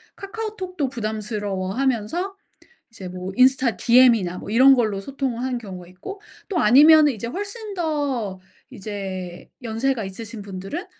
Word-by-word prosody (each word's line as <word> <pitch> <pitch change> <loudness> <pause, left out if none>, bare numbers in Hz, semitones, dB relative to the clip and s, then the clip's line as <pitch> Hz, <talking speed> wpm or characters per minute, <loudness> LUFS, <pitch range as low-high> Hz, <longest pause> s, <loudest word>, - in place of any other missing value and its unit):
카카오톡도 390 -7 -4
부담스러워하면서 215 - -2 0.6
이제 195 -5 -9
뭐 185 +1 -6
인스타 255 -4 +4
DM이나 230 -7 +4
뭐 - - -9
이런 265 +4 +7
걸로 215 -5 0
소통을 260 0 -3
하는 255 -1 -2
경우가 185 -6 -9
있고 185 - -9 0.3
또 360 - 0
아니면 300 +6 +7
이제 230 -3 -4
훨씬 410 - -6
더 285 - -2 0.3
이제 190 -3 -7
연세가 230 +1 -1
있으신 215 +3 -8
분들은 195 - -6
235 Hz, 315 characters per minute, -22 LUFS, 200-290 Hz, 0.6 s, 이런